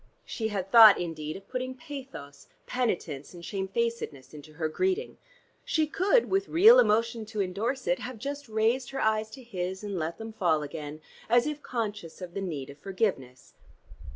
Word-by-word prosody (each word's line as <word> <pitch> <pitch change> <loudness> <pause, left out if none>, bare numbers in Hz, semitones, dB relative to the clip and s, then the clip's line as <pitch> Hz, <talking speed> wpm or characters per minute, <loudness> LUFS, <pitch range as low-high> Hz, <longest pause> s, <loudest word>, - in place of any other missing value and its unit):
She 220 - -3
had 195 -3 -4
thought 220 -3 +9
indeed 155 -3 -4
of 195 - -15
putting 255 0 -4
pathos, 255 - -9 0.2
penitence, 175 - -2
and 170 -1 -10
shamefacedness 195 - -3
into 150 +1 -12
her 160 +1 -2
greeting: 375 - -1 0.4
she 315 -1 +1
could 395 +10 +2
with 390 +1 0
real 440 +9 +8
emotion 230 - +2
to 215 -1 -6
endorse 210 +8 -1
it 265 - +1
have 250 0 -6
just 280 +2 -6
raised 225 +4 +1
her 270 - -4
eyes 220 0 +1
to 260 +3 -11
his 190 -4 -4
and 200 -3 -3
let 160 +1 -3
them 225 0 -7
fall 165 -7 +1
again, 150 0 -7 0.3
as 240 +1 +5
if 300 0 -3
conscious 210 - -4
of 180 -2 -8
the 195 - -3
need 145 -7 -4
of 140 - -16
forgiveness. 180 - -3
215 Hz, 175 wpm, -28 LUFS, 170-255 Hz, 0.4 s, thought